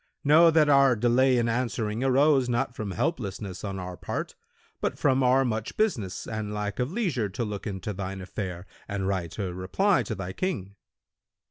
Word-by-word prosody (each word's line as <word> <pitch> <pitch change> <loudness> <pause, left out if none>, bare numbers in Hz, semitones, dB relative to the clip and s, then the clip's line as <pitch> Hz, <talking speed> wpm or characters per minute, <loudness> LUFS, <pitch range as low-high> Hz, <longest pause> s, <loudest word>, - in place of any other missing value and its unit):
Know 160 +4 +7
that 160 -2 +4
our 140 -3 +5
delay 125 +3 +3
in 120 -1 +1
answering 115 -1 -1
arose 135 0 +4
not 120 +1 -1
from 110 -4 -4
helplessness 100 - -3
on 100 -2 -4
our 90 -1 -6
part, - - -4 0.5
but - - -2
from 135 0 +2
our 130 +1 +4
much 110 -2 -3
business 115 - -1
and 110 -1 -4
lack 105 0 -3
of 125 +4 -1
leisure 170 - -1
to 115 +5 -3
look 105 -1 -5
into 100 +1 -4
thine 95 0 -5
affair 90 -1 -5 0.2
and 100 -2 -2
write 90 -4 -2
a 95 -4 -3
reply 175 - +1
to 110 - -4
thy 95 -1 -5
King.' 100 - -3
110 Hz, 175 wpm, -27 LUFS, 95-135 Hz, 0.5 s, Know